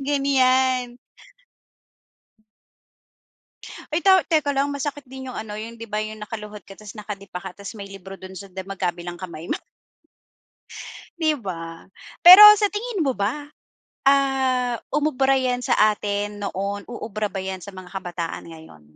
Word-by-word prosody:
Ganyan. 260 -3 +2 3.0
Ay 310 - +1
ta 385 - +7
teka 305 -2 +1
lang, 280 +1 +1
masakit 285 +1 -4
din 265 0 -8
yung 255 - -7
ano, 215 -1 -6
yung 230 +1 -7
'di 230 0 -9
ba, 210 - 0
yung 215 0 -6
nakaluhod 210 -2 -8
ka 195 - -13
ta's 215 0 -11
nakadipa 200 -4 -7
ka, 190 - -6
ta's 200 +3 -8
may 200 -2 -8
libro 195 0 -10
do'n 190 0 -11
sa 200 - -9
di 190 0 -7
magkabilang 175 -2 -4
kamay 170 -3 -8
mo. - - 0 1.6
'Di 310 -1 +2
ba. 165 -6 -7 0.4
Pero 365 +4 +12 0.2
sa 415 0 +2
tingin 420 -6 -2
mo 265 - +1
ba, 240 +8 -2 0.6
ah, 265 -3 +2 0.2
umubra 270 -3 +2
yan 250 -1 -1
sa - - +2 0.2
atin 205 0 -4
noon, 200 +1 -3
uubra 215 -3 -4
ba - - -5
'yan 190 -1 -5
sa 200 - -8
mga 185 -1 -11
kabataan 175 -3 -5
ngayon? 160 - -14
215 Hz, 150 wpm, -23 LUFS, 195-270 Hz, 3.0 s, Pero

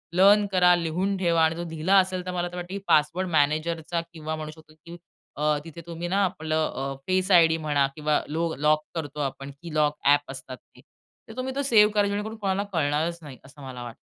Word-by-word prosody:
Learn 200 +3 +6
करा 180 -1 +5
लिहून 175 +4 -1
ठेवा 170 -3 +2
आणि 160 0 +2
तो 170 - -4
दिला 165 +4 +1
असेल 185 -1 -1
तर 180 - -3
मला 175 -1 -2
तर 180 - -10
वाटत 175 -1 -5
की 195 - -4
पासवर्ड 165 +5 +2
मॅनेजरचा 160 +2 0
किंवा 155 -1 -5
म्हणू 155 -1 -6
शकतो 155 0 -18
की 170 +2 -12 0.4
अ, 150 0 +2
तिथे 165 0 -10
तुम्ही 170 +1 -5
ना 195 +3 +1
आपलं 160 -4 -1
अ, 135 +1 -3
फेस 185 +1 +1
आयडी 165 -2 +6
म्हणा 145 -2 +2
किंवा 150 -1 0
लो 165 +2 -2
लॉक 150 +1 +2
करतो 150 -3 -5
आपण 135 0 -4
की 170 -2 -8
लॉक 150 -1 +2
ॲप 145 -1 +3
असतात 130 -1 -8 0.2
की - - -17 0.5
तर 225 - -11
तुम्ही 260 +1 -3
तो 280 - 0
सेव्ह 215 -5 +5
करा. 205 -1 +2
जेणेकरून 210 +2 -3
कोणाला 195 -1 -1
कळणारच 160 +2 0
नाही 135 -4 -10
असं 140 +2 -15
मला 130 -2 -7
वाटतं. 120 -1 -9
165 Hz, 215 wpm, -25 LUFS, 150-185 Hz, 0.5 s, Learn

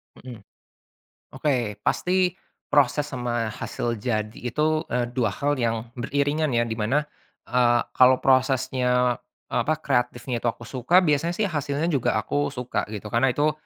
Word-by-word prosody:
Mhm. 125 -3 -10 1.0
Oke, 120 -8 -1
pasti 180 0 +2 0.4
proses 145 +1 +3
sama 120 -4 -2
hasil 115 +1 -3
jadi 110 -1 -2
itu, 155 +4 +1
eee, 120 -1 0
dua 120 -4 +1
hal 145 +7 0
yang 115 0 -1
beriringan 145 +4 0
ya, 120 0 +2
dimana, 115 +6 0 0.4
eee, 120 -1 +3
kalau 130 0 +6
prosesnya, 125 -2 +2 0.3
apa 155 - +1
kreatifnya 125 -2 -1
itu 120 - +3
aku 115 - -4
suka, 135 +8 +3
biasanya 165 0 +1
sih 210 -2 +1
hasilnya 145 0 -1
juga 140 -7 +1
aku 145 -1 -1
suka 125 -2 -2
gitu, 105 0 -6
karena 120 +4 +2
itu, 150 +3 +2
125 Hz, 140 wpm, -24 LUFS, 120-145 Hz, 1.0 s, kalau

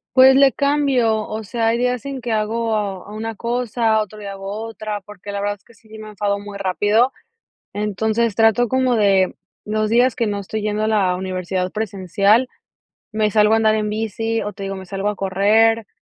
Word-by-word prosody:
Pues 260 0 +8
le 275 -1 +5
cambio. 270 -7 +1
O 220 +1 -5
sea, 225 +3 -1
hay 230 +1 +2
días 250 +1 -1
en 275 -2 -5
que 235 -1 -4
hago 215 -3 -1
una 220 +1 -5
cosa, 235 -1 0
otro 215 0 -7
día 200 -1 -7
hago 195 0 -7
otra. 215 -2 -5
Porque 205 0 -10
la 200 - -3
verdad 205 0 -2
es - - -37
que 235 - -20
sí, 220 0 -24
sí 220 - -11
me 215 - -9
enfado 205 -1 -2
muy 205 0 -8
rápido. 205 +6 +2 0.6
Entonces 215 +2 -1
trato, 225 +2 +3
como 260 0 +1
de 195 -3 +3 0.3
los 215 0 -1
días 245 +2 +3
que 230 - 0
no 205 -1 -2
estoy 215 +2 -5
yendo 210 0 -1
a - - +1
la 200 -4 +2
universidad 185 0 -3
presencial, 205 +3 +1 0.6
me 215 -1 0
salgo 210 +1 +4
a - - +6
andar 220 -1 +3
en 215 -1 -1
bici, 225 +1 -2
o, 210 - -5
te 200 - -11
digo, 195 0 -4
me 190 0 -8
salgo 195 +2 -2
a 210 - -3
correr. 210 +4 +2
215 Hz, 200 wpm, -20 LUFS, 200-225 Hz, 0.6 s, Pues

